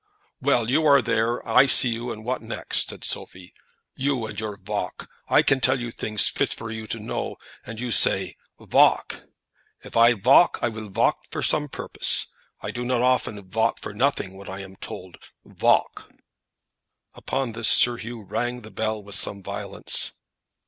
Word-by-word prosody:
"Well, 125 Hz, -4 st, +1 dB
you 155 Hz, +4 st, +2 dB
are 140 Hz, -1 st, +6 dB
there; 115 Hz, +2 st, -1 dB
I 135 Hz, -, +5 dB
see 130 Hz, -1 st, +7 dB
you; 120 Hz, +1 st, -4 dB
and 110 Hz, 0 st, -9 dB
what 130 Hz, +1 st, -3 dB
next?" -, -, -1 dB
said -, -, -9 dB
Sophie. 90 Hz, -1 st, -5 dB, 0.4 s
"You, 130 Hz, -3 st, -1 dB
and 110 Hz, -, -7 dB
your 105 Hz, -2 st, -5 dB
valk! -, -, -5 dB, 0.2 s
I -, -, +4 dB
can 135 Hz, -1 st, +2 dB
tell 130 Hz, +1 st, +2 dB
you 120 Hz, -1 st, -5 dB
things 110 Hz, -2 st, +3 dB
fit -, -, 0 dB
for 115 Hz, -1 st, -8 dB
you 110 Hz, -1 st, -7 dB
to 115 Hz, -, -3 dB
know, 110 Hz, +2 st, -5 dB, 0.3 s
and 115 Hz, -1 st, -8 dB
you 125 Hz, 0 st, -4 dB
say, -, -, +3 dB, 0.2 s
Valk. -, -, +2 dB, 0.6 s
If -, -, -11 dB
I 115 Hz, +1 st, +6 dB
valk, 125 Hz, -, +4 dB
I 120 Hz, -, +1 dB
will 110 Hz, -2 st, -8 dB
valk 95 Hz, -, 0 dB
to -, -, -4 dB
some 150 Hz, -1 st, +3 dB
purpose. -, -, +3 dB, 0.3 s
I -, -, -5 dB
do 125 Hz, -, -5 dB
not 125 Hz, -1 st, -1 dB
often 110 Hz, -6 st, -1 dB
valk 115 Hz, +4 st, -1 dB
for -, -, -8 dB
nothing 105 Hz, -5 st, -1 dB
when 100 Hz, +1 st, -11 dB
I 95 Hz, +1 st, -7 dB
am 95 Hz, 0 st, -12 dB
told 90 Hz, -1 st, -10 dB, 0.3 s
Valk!" -, -, 0 dB, 1.0 s
Upon 135 Hz, -3 st, -4 dB
this, 115 Hz, 0 st, 0 dB
Sir 120 Hz, -1 st, +5 dB
Hugh 115 Hz, -1 st, -8 dB
rang 120 Hz, +4 st, -4 dB
the 110 Hz, -1 st, -13 dB
bell 110 Hz, +1 st, -3 dB
with 100 Hz, 0 st, -6 dB
some 100 Hz, -1 st, 0 dB
violence. -, -, -2 dB
115 Hz, 175 wpm, -23 LUFS, 105-125 Hz, 1.0 s, see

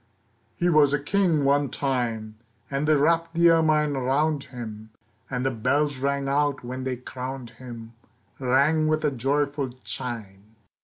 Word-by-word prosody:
HE 175 Hz, -, +1 dB
was 150 Hz, -3 st, +5 dB
a -, -, -1 dB
king 160 Hz, -1 st, +1 dB
one 140 Hz, 0 st, +3 dB
time, 115 Hz, -5 st, -2 dB, 0.4 s
And 140 Hz, +2 st, -1 dB
they 155 Hz, -, +5 dB
wrapped 165 Hz, +3 st, +2 dB
the 170 Hz, 0 st, +6 dB
ermine 155 Hz, -3 st, +3 dB
around 140 Hz, +3 st, 0 dB
him, 110 Hz, -4 st, -8 dB, 0.4 s
And 125 Hz, -1 st, -2 dB
the 135 Hz, -, +2 dB
bells 140 Hz, +4 st, 0 dB
rang 140 Hz, 0 st, -1 dB
out 140 Hz, 0 st, +1 dB
when 130 Hz, +2 st, -5 dB
they 130 Hz, -1 st, -1 dB
crowned 125 Hz, 0 st, -7 dB
him, 115 Hz, -2 st, -9 dB, 0.5 s
Rang 140 Hz, +5 st, +3 dB
with 155 Hz, 0 st, +1 dB
a 150 Hz, -, +2 dB
joyful 140 Hz, +1 st, -1 dB
chime. 110 Hz, -4 st, -7 dB
140 Hz, 150 wpm, -25 LUFS, 125-150 Hz, 0.5 s, the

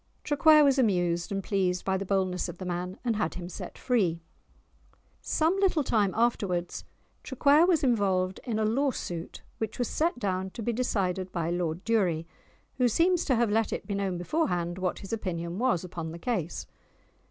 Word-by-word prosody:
Traquair 305 Hz, +1 st, +6 dB
was 275 Hz, -1 st, +4 dB
amused 175 Hz, -7 st, +1 dB
and 195 Hz, -1 st, -2 dB
pleased 185 Hz, -3 st, 0 dB
by 190 Hz, -, +1 dB
the 190 Hz, 0 st, -3 dB
boldness 185 Hz, -2 st, 0 dB
of 175 Hz, -, -8 dB
the 185 Hz, -, -7 dB
man, 180 Hz, +1 st, -3 dB
and 230 Hz, -3 st, +1 dB
had 210 Hz, -6 st, -1 dB
him 175 Hz, -1 st, -6 dB
set 180 Hz, -, -8 dB
free. 195 Hz, -10 st, +1 dB, 1.0 s
Some 330 Hz, +5 st, +1 dB
little 370 Hz, -6 st, +2 dB
time 210 Hz, -6 st, +2 dB
afterwards 195 Hz, -7 st, 0 dB, 0.4 s
Traquair 285 Hz, +5 st, +4 dB
was 335 Hz, -6 st, +3 dB
involved 190 Hz, -7 st, +1 dB
in 230 Hz, -3 st, -2 dB
a 220 Hz, -, +1 dB
law 270 Hz, +6 st, +2 dB
suit 170 Hz, -9 st, -6 dB, 0.2 s
which 220 Hz, -1 st, -3 dB
was 245 Hz, -, 0 dB
set 330 Hz, -2 st, 0 dB
down 190 Hz, -4 st, -2 dB
to 230 Hz, -, -5 dB
be 235 Hz, -, 0 dB
decided 190 Hz, -6 st, -1 dB
by 170 Hz, -1 st, -2 dB
Lord 175 Hz, 0 st, -2 dB
Durie, 185 Hz, -8 st, +1 dB, 0.5 s
who 250 Hz, -1 st, +3 dB
seems 345 Hz, -, +2 dB
to 260 Hz, -, +2 dB
have 230 Hz, -2 st, +2 dB
let 225 Hz, +1 st, +1 dB
it -, -, -4 dB
be 205 Hz, -, -4 dB
known 195 Hz, -2 st, -1 dB
before 305 Hz, -, 0 dB
hand 175 Hz, -1 st, -2 dB
what 185 Hz, -1 st, -1 dB
his 195 Hz, -, -7 dB
opinion 175 Hz, -4 st, -3 dB
was 240 Hz, -9 st, +1 dB
upon 170 Hz, -3 st, -6 dB
the 170 Hz, -, -7 dB
case. 180 Hz, -4 st, -3 dB
195 Hz, 185 wpm, -28 LUFS, 180-245 Hz, 1.0 s, Traquair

